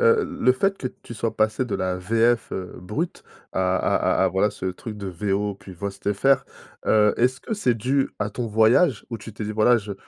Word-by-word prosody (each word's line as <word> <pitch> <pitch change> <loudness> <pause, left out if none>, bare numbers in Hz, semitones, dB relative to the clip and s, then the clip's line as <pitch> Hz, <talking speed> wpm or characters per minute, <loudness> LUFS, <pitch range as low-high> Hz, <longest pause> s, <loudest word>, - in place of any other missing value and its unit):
heu, 460 -2 +4 0.2
le 125 - +5
fait 195 +9 0
que 130 - -3 0.2
tu - - -9
sois 115 0 -3
passé 110 +4 +1
de 110 - -3
la 90 0 -1
VF 115 +5 +2
heu, 90 -1 -4
brute 135 - -4 0.3
à 95 0 +1
à 95 - +2
à - - +4
voilà 95 +3 +2
ce 95 - -8
truc 105 +4 -5
de 100 -2 -5
VO 100 +2 -1
plus 95 -1 -12
VOST 100 +2 -3
FR 135 +5 +3 0.4
heu, 105 -1 +5
est-ce 125 +1 +2
que 220 - -6
c'est 130 - +1
dû 135 +5 +1
à 105 0 -1
ton 120 +2 -3
voyage 110 +6 +3
où 115 - -4
tu 110 - -9
t'es 110 - -5
dit: 110 - -3
«Voilà, 110 +3 +4
je 105 -3 -4
110 Hz, 220 wpm, -24 LUFS, 100-125 Hz, 0.4 s, le